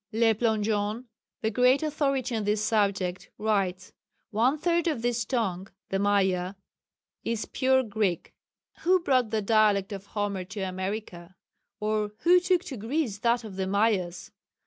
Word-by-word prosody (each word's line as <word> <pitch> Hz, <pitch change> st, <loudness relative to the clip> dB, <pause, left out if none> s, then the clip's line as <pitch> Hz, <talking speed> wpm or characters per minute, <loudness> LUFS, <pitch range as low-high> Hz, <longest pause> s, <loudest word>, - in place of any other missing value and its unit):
Le 225 Hz, 0 st, +3 dB
Plongeon, 215 Hz, 0 st, 0 dB, 0.4 s
the 220 Hz, -, 0 dB
great 250 Hz, +6 st, +4 dB
authority 275 Hz, -5 st, 0 dB
on 220 Hz, -, -1 dB
this 210 Hz, +1 st, 0 dB
subject, 200 Hz, -4 st, 0 dB
writes: 195 Hz, -4 st, -1 dB, 0.4 s
"One 240 Hz, +7 st, +2 dB
third 340 Hz, +2 st, +1 dB
of 295 Hz, -8 st, -1 dB
this 240 Hz, -2 st, 0 dB
tongue 195 Hz, -7 st, -1 dB, 0.2 s
(the 195 Hz, -, 0 dB
Maya) 190 Hz, -2 st, +1 dB, 0.7 s
is 230 Hz, -1 st, -2 dB
pure 260 Hz, 0 st, +2 dB
Greek. 205 Hz, -6 st, -2 dB, 0.5 s
Who 370 Hz, +2 st, +3 dB
brought 255 Hz, -7 st, +2 dB
the 215 Hz, -1 st, -1 dB
dialect 210 Hz, -2 st, +3 dB
of 195 Hz, 0 st, -8 dB
Homer 205 Hz, -3 st, -2 dB
to 195 Hz, +3 st, -7 dB
America? 185 Hz, -1 st, -5 dB, 0.4 s
or 210 Hz, -1 st, -1 dB
who 360 Hz, +1 st, +6 dB
took 360 Hz, -1 st, +1 dB
to 265 Hz, -, -7 dB
Greece 225 Hz, -1 st, -2 dB
that 235 Hz, +1 st, +1 dB
of 205 Hz, -4 st, -9 dB
the 190 Hz, -1 st, -1 dB
Mayas? 195 Hz, -3 st, 0 dB
215 Hz, 145 wpm, -27 LUFS, 195-245 Hz, 0.7 s, who